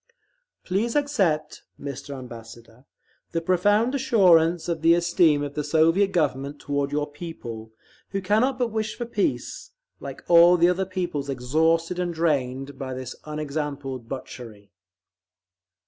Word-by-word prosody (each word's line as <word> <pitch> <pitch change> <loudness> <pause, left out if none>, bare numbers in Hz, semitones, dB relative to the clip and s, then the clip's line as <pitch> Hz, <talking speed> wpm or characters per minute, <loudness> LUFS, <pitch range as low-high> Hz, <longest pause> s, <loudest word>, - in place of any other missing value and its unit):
Please 210 +6 -1
accept, 200 - 0 0.2
Mr. 140 0 -6
Ambassador, 115 0 -12 0.5
the 165 - +1
profound 205 +8 +2
assurance 180 - +4
of 165 -2 -2
the 165 +1 +5
esteem 170 -4 +3
of 145 -1 -5
the 150 - -2
Soviet 165 +6 +3
Government 145 -4 -1
toward 140 -1 -2
your 145 0 0
people, 145 -8 -8 0.4
who 195 - -2
cannot 220 +8 +1
but 245 -3 -1
wish 220 0 -3
for 240 - -3
peace, 215 -4 -2 0.3
like - - -8
all 175 +1 +7
the 170 +1 +5
other 185 +1 0
peoples 175 -7 -3
exhausted 160 +7 +1
and 175 -2 -2
drained 135 -4 -1
by 130 -1 -4
this 130 -1 -6
unexampled 145 -5 -4
butchery…. 115 -6 -9
160 Hz, 130 wpm, -24 LUFS, 140-180 Hz, 0.5 s, all